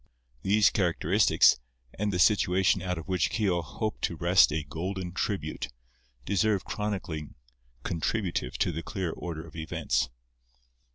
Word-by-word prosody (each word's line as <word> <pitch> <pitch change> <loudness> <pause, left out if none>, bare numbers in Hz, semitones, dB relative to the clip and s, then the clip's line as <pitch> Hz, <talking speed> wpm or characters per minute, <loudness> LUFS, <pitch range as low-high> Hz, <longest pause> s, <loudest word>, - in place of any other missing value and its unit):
These 105 +1 +4
characteristics, 90 -1 +3 0.3
and 105 +1 -1
the 90 - -1
situation 95 -1 +3
out 90 -1 -2
of 80 - -7
which 90 -3 +1
Keogh 95 -6 +1
hoped 110 +7 -4
to 85 - -3
wrest 85 0 +5
a 75 0 -1
golden 90 +4 -4
tribute, 95 -4 -2 0.6
deserve 100 0 +1
chronicling 95 -8 -4 0.5
contributive 90 +2 -2
to - - +1
the 80 0 -4
clear 90 -1 -3
order 80 -2 -6
of - - -14
events. 65 -5 -1
90 Hz, 130 wpm, -28 LUFS, 80-100 Hz, 0.6 s, wrest